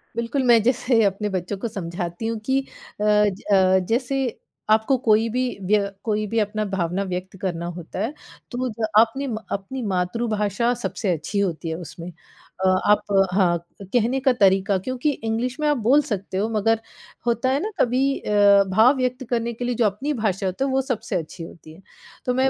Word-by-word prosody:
बिल्कुल, 235 +4 -1
मैं 235 -2 +6
जैसे 245 -1 +2
अपने 200 +1 0
बच्चों 185 +2 -3
को 215 - -3
समझाती 175 -1 -4
हूँ 230 0 -2
कि 265 +2 +2 0.4
अ - - +1
अ, 200 -2 +3
जैसे 255 +1 0 0.3
आपको 220 +5 +3
कोई 220 +1 +4
भी 250 +3 -1 0.3
व्य 200 -1 +2
कोई 215 -1 0
भी 230 +2 0
अपना 215 0 -1
भावना 190 -1 -1
व्यक्त 185 0 -5
करना 170 -3 -2
होता 175 +1 -7
है 225 +8 -1 0.4
तो 255 +1 -2
ज 220 - +2
अपने 230 +5 +2 0.3
अपनी 200 +7 -4
मातृभाषा 210 +4 0
सबसे 195 -6 -1
अच्छी 165 +6 -3
होती 175 -4 -1
है 160 - -2
उसमें। 170 +1 -8 0.6
अ, - - +5 0.2
आप 210 - +4 0.3
हाँ, 180 -3 +3 0.2
कहने 235 +6 0
का 265 -1 +3
तरीक़ा 195 0 +4
क्योंकि 255 +9 -1
इंग्लिश 235 +5 -2
में 300 - +1
आप 295 -2 +2
बोल 290 +3 +6
सकते 195 -1 -4
हो 210 +3 0
मगर 225 +2 +2 0.5
होता 235 +2 +1
है 270 +2 +2
ना, 430 - -3
कभी 265 +3 +2
अ, 205 -1 +5
भाव 220 +8 +5
व्यक्त 255 0 -1
करने 235 -1 -1
के 245 +2 -5
लिए 245 0 -1
जो 230 - +2
अपनी 215 +9 -1
भाषा 195 -2 0
होती 190 +7 -1
है, - - -1
वो 265 0 +2
सबसे 240 -4 -3
अच्छी 165 0 -4
होती 160 -1 -12
है। 170 - -16 0.4
तो 250 - +1
मैं 260 +1 +3
215 Hz, 185 wpm, -23 LUFS, 190-245 Hz, 0.6 s, मैं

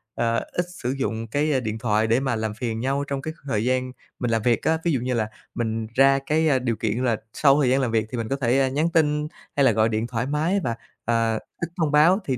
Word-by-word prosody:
ờ, 115 0 +1 0.2
ít 175 - -1 0.2
sử 125 - 0
dụng 115 -4 -3
cái, 145 +7 0
a, 130 - +2
điện 110 -3 -3
thoại 110 -1 +1
để 115 +3 +3
mà 130 -3 -1
làm 110 -1 -2
phiền 115 0 -3
nhau 135 +3 0
trong 140 -1 -3
cái 155 +3 -5
thời 110 -5 0
gian 130 0 0 0.3
mình 120 -2 -1
làm 115 -1 +1
việc 120 +1 +2
á, 160 0 +2
ví 170 - +1
dụ 135 - +1
như 125 +1 -2
là 110 -3 0 0.3
mình 110 -1 -2
ra 135 +1 +5
cái, 160 +1 +2
a, 135 -3 +3
điều 120 -2 -1
kiện 120 +3 -1
là 120 -4 +2 0.2
sau 140 +2 +4
thời 130 - +3
gian 135 +2 +3
làm 125 -3 0
việc 110 -1 +1
thì 125 - -3
mình 115 -1 -2
có 135 - +1
thể, 130 -1 +1
a, 135 - +3
nhắn 150 +5 +1
tin 150 -2 +2 0.3
hay 140 - +3
là 130 - +6
gọi 110 +1 +2
điện 110 +1 -1
thoải 120 -1 -2
mái 155 +8 +1
và, 115 -2 -1 0.3
à, 115 -1 +2
ít 170 +9 -6
thông 160 -4 +1
báo 160 +6 +5
thì 130 -3 -1
125 Hz, 270 wpm, -24 LUFS, 115-140 Hz, 0.3 s, là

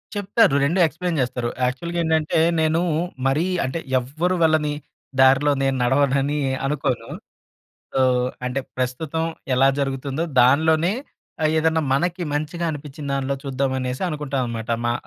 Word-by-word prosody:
చెప్తారు. 205 -3 +3
2 170 +7 +1
ఎక్స్‌ప్లైన్ 165 +1 -2
చేస్తారు. 120 -1 -2 0.2
యాక్చువల్‌గా 170 +8 -2
ఏంటంటే 160 0 +1 0.2
నేను 160 +1 +2 0.5
మరీ 140 +5 +2 0.2
అంటే 130 +6 -3 0.2
ఎవ్వరు 155 +9 -1
వాళ్ళని 155 -2 +3 0.5
దారిలో 135 +2 +5
నేను 135 0 +1
నడవనని 140 +3 +2 0.3
అనుకోను. 130 -5 -2 0.8
సో, 135 - +1 0.4
అంటే 125 +2 -1 0.2
ప్రస్తుతం 140 +6 -2 0.3
ఎలా 135 +2 +4
జరుగుతుందో 135 +2 -2 0.2
దానిలోనే 160 +7 +4 0.5
ఆహ్, 155 0 +3
ఏదైనా 160 0 +2
మనకి 175 +6 0
మంచిగా 155 +4 -2
అనిపించిన 145 -1 -8
దాన్లో 140 0 -1
చూద్దామనేసి 130 -1 -2
అనుకుంటాననమాట. 130 -7 -3
మా 120 - +2
145 Hz, 120 wpm, -22 LUFS, 130-160 Hz, 0.8 s, దారిలో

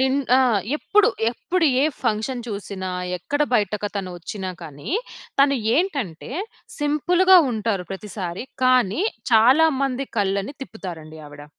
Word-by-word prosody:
నిన్ 265 +1 +2 0.2
ఆ! - - +5 0.4
ఎప్పుడు, 420 +7 +3 0.2
ఎప్పుడు 335 +7 0 0.2
ఏ - - +4 0.2
ఫంక్షన్ 230 +3 -1
చూసినా, 200 -3 -5 0.3
ఎక్కడ 290 - -1
బయటకతను 205 -2 -1
వచ్చినా 185 +2 -5
కానీ, 145 - -8 0.5
తను 280 -1 +4 0.2
ఏంటంటే, 275 - -2 0.5
సింపుల్‌గా 355 +6 +4
ఉంటారు, 215 -4 -1
ప్రతిసారి. 190 -1 -5 0.2
కానీ 255 - +3 0.3
చాలా 255 +9 +6
మంది 270 0 -1
కళ్ళని 200 +6 -1
తిప్పుతారండి 165 -9 -8
ఆవిడ. 145 0 -11
220 Hz, 115 wpm, -22 LUFS, 190-280 Hz, 0.5 s, చాలా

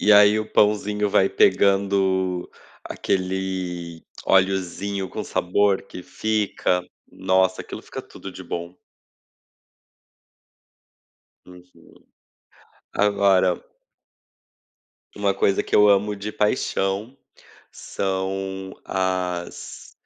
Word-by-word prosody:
e 105 - +7
aí, 105 +1 +7
o 110 - -7
pãozinho 105 0 +2
vai 95 - +4
pegando 95 -2 +2 0.3
aquele 90 -3 -3 0.2
oleozinho, 95 +1 +1
com - - -4
sabor 95 +2 +1
que 90 -2 -10
fica, 105 -4 -1 0.3
nossa, 95 0 +1
aquilo - - -8
fica - - -7
tudo - - -11
de - - -9
bom. 85 +1 -6 2.7
Uhum, 90 0 -17 1.0
agora 100 -3 +3 1.6
uma 100 -1 +1
coisa 95 0 +2
que - - -1
eu 105 0 +7
amo 100 +1 +3
de 105 +2 -5
paixão, 105 +2 -1 0.5
são 95 0 -4
as 90 -2 -3
95 Hz, 85 wpm, -23 LUFS, 95-100 Hz, 2.7 s, e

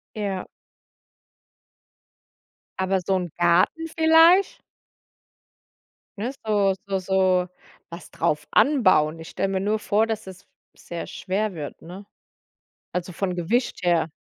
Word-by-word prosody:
Ja. 200 -3 -3 2.3
Aber 190 0 0
so 190 -1 +1
'n 175 -2 -5
Garten 175 - +2
vielleicht? 325 +4 +4 1.6
Ne, 235 +6 -3
so 200 -3 +2
so 195 -1 -1
so, 185 -1 +1 0.4
was 170 +1 -11
drauf 150 0 -1
anbauen. 185 - +3
Ich 160 - -9
stelle 195 - -2
mir 190 -1 -1
nur 210 +2 0
vor, 215 +2 +1
dass 220 -2 -4
es 190 0 -11 0.3
sehr 170 -1 -7
f - - -10
schwer 200 +2 -2
wird, 150 -3 -8
ne? 185 +4 -10 0.9
Also 180 0 -3
von 180 +1 -3
Gewicht 185 +7 -1
her. 170 -2 +2
190 Hz, 120 wpm, -24 LUFS, 175-215 Hz, 2.3 s, vielleicht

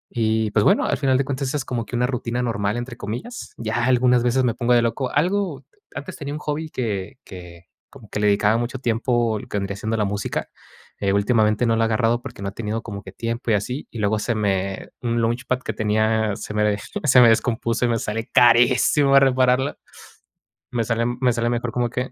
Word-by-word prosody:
Y 110 -2 +1
pues, 105 0 +2
bueno, - - +4
al - - 0
final 135 -2 +2
de 135 - 0
cuentas 135 0 -3
esa 150 - -1
es 135 - -4
como 120 -3 -3
que 125 - -6
una 120 +1 +2
rutina 125 -1 -2
normal, 105 -2 -1
entre 120 0 -6
comillas, 120 - -6
ya 115 +1 -1
algunas 125 -1 +3
veces 125 +2 +2
me 120 - +1
pongo 125 0 +1
de 120 - +5
loco. 125 +3 -1
Algo 175 -2 0 0.3
antes 145 - -7
tenía 145 0 -5
un - - -5
hobby 150 +1 -4
que 105 -5 -3
que 90 -3 -11 0.3
como 120 -7 -15
que - - -4
le 105 - +2
dedicaba 105 +2 +3
mucho 120 +2 -3
tiempo, 120 -2 0
lo - - -11
que - - -3
vendría 100 0 -4
siendo 110 +2 -2
la 105 - +1
música, 100 +1 -3 0.5
eh, 100 -1 +1
últimamente 105 +2 +2
no 115 - +2
lo 115 - +1
ha - - +3
agarrado 115 +1 +1
porque 100 - -9
no 100 - -2
he - - -12
tenido 110 0 -4
como 100 -3 -7
que 95 - -10
tiempo 115 +4 -4
y - - +4
así, 125 +8 -3
y - - -8
luego 105 +1 +1
se 120 +2 -1
me 95 -2 -1
un 120 -1 0
launchpad 125 +3 -1
que 110 - -4
tenía 110 0 +1
se 105 - -7
me 105 - +2
desto 105 -1 -2
se 130 -3 +6
me 120 - +8
descompuso 115 +1 +1
y - - +1
me 115 - +1
sale 110 +3 -4
carísimo 125 +4 +5
repararla, 130 0 +2 0.9
me 120 -2 0
sale 115 0 0 0.2
me 125 -1 +4
sale 115 0 0
mejor, 120 0 -2
como 120 0 -1
que, 125 +2 -3
115 Hz, 225 wpm, -22 LUFS, 105-125 Hz, 0.9 s, me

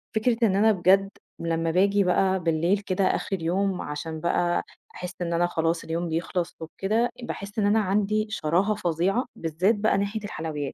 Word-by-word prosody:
فكرة 225 +1 +2
إن 190 - +1
أنا 220 +2 +5
بجد 195 +1 +3 0.3
لمّا 165 0 -1
باجي 200 +3 +3
بقى 190 +1 +2
بالليل 170 +4 +1
كده 195 -1 -1
آخِر 195 - 0
اليوم 185 +3 -1
عشان 155 +2 -5
بقى 175 +1 +1 0.3
أحس 180 0 -5
إن 170 -1 -1
أنا 175 +1 +2
خلاص 165 0 -1
اليوم 170 +1 -3
بيخلص 170 +2 -2
وبكده، 210 +8 0
باحس 205 -2 -5
إن 205 - +2
أنا 215 +2 +4
عندي 210 +2 +1
شراهة 195 +2 +1
فظيعة 190 +5 0
بالذّات 170 +7 +1
بقى 210 0 +2
ناحية 200 +2 -2
الحلويات. 155 -7 -4
185 Hz, 170 wpm, -26 LUFS, 165-205 Hz, 0.3 s, أنا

